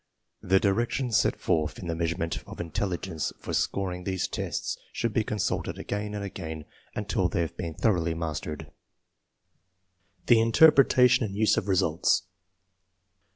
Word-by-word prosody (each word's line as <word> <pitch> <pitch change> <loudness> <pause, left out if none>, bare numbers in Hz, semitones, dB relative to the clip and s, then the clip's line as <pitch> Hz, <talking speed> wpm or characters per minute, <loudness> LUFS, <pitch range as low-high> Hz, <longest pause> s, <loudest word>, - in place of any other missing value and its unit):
The 95 +1 +3
directions 115 +4 +1
set - - +2
forth 75 -1 0
in - - -8
The 85 - -1
Meas 85 0 -1
urement 85 0 -3
of - - -10
Intelligence 85 0 -3
for - - -6
scoring 90 -2 -1
these 95 -1 -1
tests - - -3 0.2
should 115 -2 -2
be 110 - +2
consulted 105 -2 -2
again 105 +1 -4
and 100 - -4
again 80 -6 -6 0.3
until 105 -3 0
they 85 - 0
have 85 - -3
been 85 -3 -5
thoroughly 85 -6 +1
mastered. 80 -2 -5 1.5
The 115 -2 +5
Interpretation 125 0 +5
and 100 -3 -4
use 110 +1 +3
of 100 - -2
results. 90 -2 +2
95 Hz, 145 wpm, -27 LUFS, 85-105 Hz, 1.5 s, The